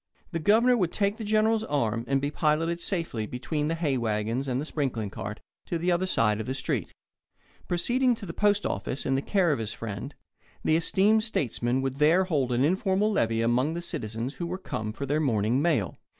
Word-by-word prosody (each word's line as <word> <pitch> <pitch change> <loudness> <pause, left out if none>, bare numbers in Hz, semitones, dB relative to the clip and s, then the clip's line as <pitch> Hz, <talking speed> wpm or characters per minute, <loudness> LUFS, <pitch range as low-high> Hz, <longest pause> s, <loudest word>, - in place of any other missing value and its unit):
The 165 - -2
Governor 225 +9 +4
would 180 -6 +1
take 205 +1 0
the 225 - -5
General's 215 +1 +2
arm 115 - -1
and 135 0 +2
be 145 +1 -2
piloted 165 +3 +1
safely 165 - -2
between 150 +5 -2
the 165 - 0
hay 150 -6 0
wagons 115 +3 -1
and 125 -1 0
the 145 - -3
sprinkling 125 -10 -2
cart 105 0 -6 0.3
to 170 - -1
the 175 +2 0
other 180 +2 +1
side 105 - +2
of 110 - -7
the 130 - -2
street. 135 - -2 0.8
Proceeding 245 +8 +2
to 215 - -9
the 170 - -6
post 205 +1 +2
office 115 +7 -3
in 135 - +1
the 135 - +1
care 185 0 +2
of 140 - 0
his 110 -1 -3
friend, 115 +5 -6 0.5
the 155 - +3
esteemed 200 +6 +3
statesmen 130 - -1
would 135 0 -2
there 160 +6 +4
hold 145 -9 0
an 120 +2 +2
informal 190 +6 +2
levee 115 - +1
among 125 +7 +1
the - - -2
citizens 115 -2 -4
who 170 - -3
were 180 +2 -3
come 110 - -4
for 140 +6 -5
their 145 +3 0
morning 115 -1 +1
mail. 145 - 0
150 Hz, 205 wpm, -27 LUFS, 120-185 Hz, 0.8 s, Governor